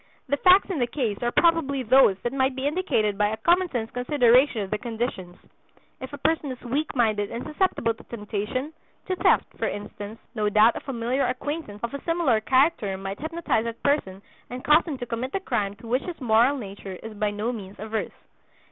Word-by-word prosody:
The 285 - +2
facts 370 +5 +6
in 335 - -2
the 245 - +1
case 235 -6 -2
are 240 0 0
probably 310 -5 +2
those 250 -5 +5
that 240 - -2
might 265 -1 +1
be 265 +1 -3
indicated 285 - 0
by 210 - +4
a 215 +1 -3
common 350 +10 +3
sense 230 -5 -3
consideration 250 -1 +3
of 190 - -8
the 210 - -1
conditions. 225 -7 -4 0.6
If 260 +1 -7
a 285 - -7
person 300 -1 0
is 255 - -7
weak 280 +6 -2
minded 215 -4 +1
and 235 - -5
susceptible 305 -7 0
to - - -16
temptation, 230 +6 -4 0.3
to 375 - -1
theft, - - +3
for - - 0
instance, 205 +1 -7
no 210 -3 0
doubt 215 +3 +5
a - - -3
familiar 250 +1 -1
acquaintance 255 -4 -4
of 235 - -3
a 280 - -5
similar 330 -10 +2
character 255 - +2
might 195 +1 -6
hypnotize 315 -7 -1
that 230 0 -6
person 200 -10 0 0.3
and 250 +1 -7
cause 305 +3 +5
him 300 -5 -4
to 245 - -5
commit 245 +3 -4
the 390 - 0
crime 205 - -2
to 225 +3 -13
which 250 +4 +1
his 355 -2 -7
moral 245 +2 +3
nature 195 -4 -8
is 225 0 -7
by 210 0 -1
no 210 +3 -2
means 200 -3 -8
averse. 220 +1 -3
240 Hz, 205 wpm, -25 LUFS, 215-285 Hz, 0.6 s, facts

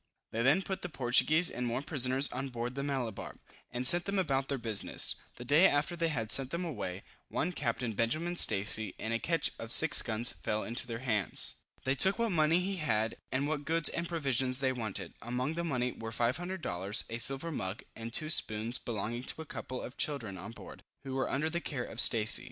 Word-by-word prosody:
They 115 - -2
then 145 +10 +3
put 190 0 -4
the 180 - -5
Portuguese 150 +5 +4
and 125 0 -3
Moor 120 +3 -2
prisoners 135 -2 +2
on 130 +2 -4
board 120 0 -5
the 140 - -4
Malabar, 130 -7 -4 0.4
and 125 +1 -3
sent 175 +6 +8
them 200 0 -2
about 135 -7 0
their 140 - -2
business. 110 -4 +1 0.2
The 120 - -10
day 150 +9 +6
after 145 +3 0
they 170 -1 -1
had 115 -8 -3
sent 135 -1 +3
them 170 +4 -4
away, 100 - -5 0.3
one 180 - -1
Captain 120 -6 -3
Benjamin 155 - -1
Stacy, 105 - +1
in 110 - -5
a 115 - 0
ketch 165 +4 0
of 115 0 -4
6 160 +5 +7
guns 115 +1 +2
fell 110 0 -3
into 120 +2 +2
their 115 +2 -6
hands. 105 -6 0 0.3
They 130 - +1
took 190 +8 +5
what 230 -2 0
money 160 0 +3
he 195 +1 -3
had, 110 -8 0 0.2
and 135 +2 -1
what 150 -1 -3
goods 165 +2 +4
and 170 0 -3
provisions 135 -6 +1
they 135 -1 +1
wanted. 105 -7 -3
Among 125 +5 -3
the 170 +1 -3
money 125 -6 -1
were 115 -1 -8
500 165 +11 -2
dollars, 95 +4 0
a 115 +1 -5
silver 135 +7 +1
mug, 95 -7 -5
and 115 0 -7
two 155 +6 -1
spoons 110 -2 0
belonging 115 +1 -4
to - - -3
a - - -17
couple 130 -3 -7
of 125 - -9
children 120 -10 -2
on 95 +3 -8
board, 115 - -12 0.2
who 135 -1 -6
were 135 0 -1
under 145 +4 -1
the 170 +2 -3
care 135 -7 -4
of 115 - +1
Stacy. 110 -3 +6
130 Hz, 215 wpm, -31 LUFS, 115-155 Hz, 0.4 s, sent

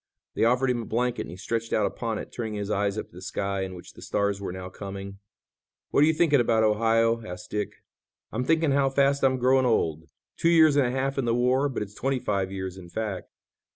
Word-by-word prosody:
They - - +2
offered 125 +2 +3
him 120 -1 -1
a - - -7
blanket 120 +2 -1
and - - -11
he 90 - -9
stretched 115 +3 -3
out 105 - +3
upon 115 -2 -3
it, - - -7
turning 110 -3 -4
his 105 0 -3
eyes 100 0 0
up - - -5
to - - -21
the - - -9
sky, 100 +1 -2
in 95 -1 -4
which 90 - -12
the - - -14
stars 100 -1 -1
were 95 - -4
now 95 0 -6
coming. 100 +1 -8 0.7
"What 145 - +4
are - - +5
you 160 - +4
thinking 155 -3 +4
about, 115 -2 +3
Ohio?" 115 +1 +2
asked 90 -3 -9
Dick. 105 -1 -3 0.6
"I'm 120 +4 -2
thinking 160 +1 +2
how 135 0 +3
fast 140 +1 +2
I'm 130 -1 +3
growing 130 +1 +3
old. 80 -8 0 0.3
Two 165 - +2
years 160 -3 +6
and 140 -3 +4
a - - -1
half 135 +1 -1
in 130 - 0
the 115 0 +1
war, 130 +3 +2
but 125 - -3
it's 105 0 -11
twenty 135 +5 -1
five 100 -5 -1
years 95 -1 -5
in 90 -2 -11
fact. 105 -1 -4
115 Hz, 240 wpm, -26 LUFS, 100-130 Hz, 0.7 s, years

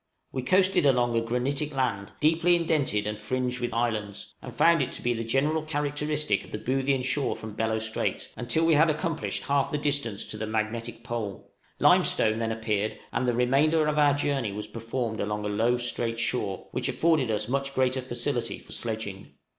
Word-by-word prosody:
} - - -49
We 130 - -2
coasted 185 +9 +3
along 120 -3 +3
a 115 - +3
granitic 135 +5 -1
land, 115 -7 -1
deeply 165 +3 +4
indented 155 -11 +1
and 105 0 -3
fringed 125 +2 -2
with 120 -1 -2
islands, 110 -3 -2
and - - -8
found 170 0 +4
it - - -1
to - - -7
be 120 - +2
the 115 0 -3
general 140 +7 +1
characteristic 150 -5 0
of - - -14
the - - -4
Boothian 135 +3 0
shore 135 +2 0
from 110 -1 -8
Bellot 110 0 0
Strait, 110 0 -2
until 125 +7 0
we 165 - +4
had 155 +2 +5
accomplished 160 +1 -2
half 140 -1 +1
the 150 - 0
distance 140 -8 -1
to 105 - -5
the 110 0 -3
magnetic 110 +2 -3
pole; 115 -5 -5 0.3
limestone 110 +1 +4
then 115 -1 -1
appeared, 110 -1 -1 0.2
and 130 - 0
the 120 - +2
remainder 145 +6 +3
of 150 0 +1
our 145 -1 +5
journey 140 -6 0
was 105 +1 -5
performed 115 -1 -4
along 105 0 -2
a - - -1
low, 115 +4 +2
straight 120 -1 -1
shore, 105 -5 -1
which - - -2
afforded 160 -7 +2
us 105 -1 -1
much 135 +2 -2
greater 130 0 +2
facility 120 -1 -2
for - - -15
sledging. 110 -4 -4
125 Hz, 195 wpm, -27 LUFS, 110-145 Hz, 0.3 s, had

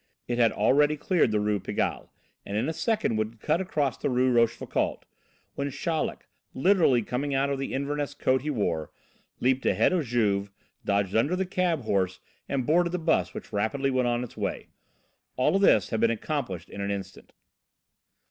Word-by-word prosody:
It 120 0 -1
had 115 -2 +5
already 145 +8 +3
cleared 175 -2 +2
the 105 -1 +1
Rue 105 0 0
Pigalle, - - -2 0.3
and 100 - -4
in 115 +6 0
a 160 - -1
second 215 - 0
would 110 +1 -3
cut 170 - +1
across 150 -9 -1
the - - -1
Rue 130 0 +2
Rochefoucauld, 115 -2 0 0.5
when 140 0 -2
Chaleck, 160 +3 -2 0.3
literally 160 - +4
coming 135 +5 -2
out 140 +1 +1
of 140 - -2
the 135 - -3
Inverness 145 +1 -2
coat 130 -2 +1
he 150 - -4
wore, 85 - -1 0.5
leaped 130 +1 +2
ahead 110 - +3
of 175 -4 +1
Juve, 100 -4 +1 0.3
dodged 100 -1 0
under 140 +11 +2
the 190 +1 -1
cab 180 -5 0
horse 95 -4 0 0.3
and 135 -3 -1
boarded 170 +4 +2
the - - +1
bus, 95 - 0
which - - -8
rapidly 135 +7 0
went 130 -1 +1
on 120 0 0
its 125 - -9
way. - - -4 0.7
All 150 +9 +2
this 200 - +4
had 110 - 0
been 115 - +4
accomplished 115 - -3
in 100 - -6
an 100 - -2
instant. 100 -1 -6
130 Hz, 180 wpm, -27 LUFS, 110-150 Hz, 0.7 s, had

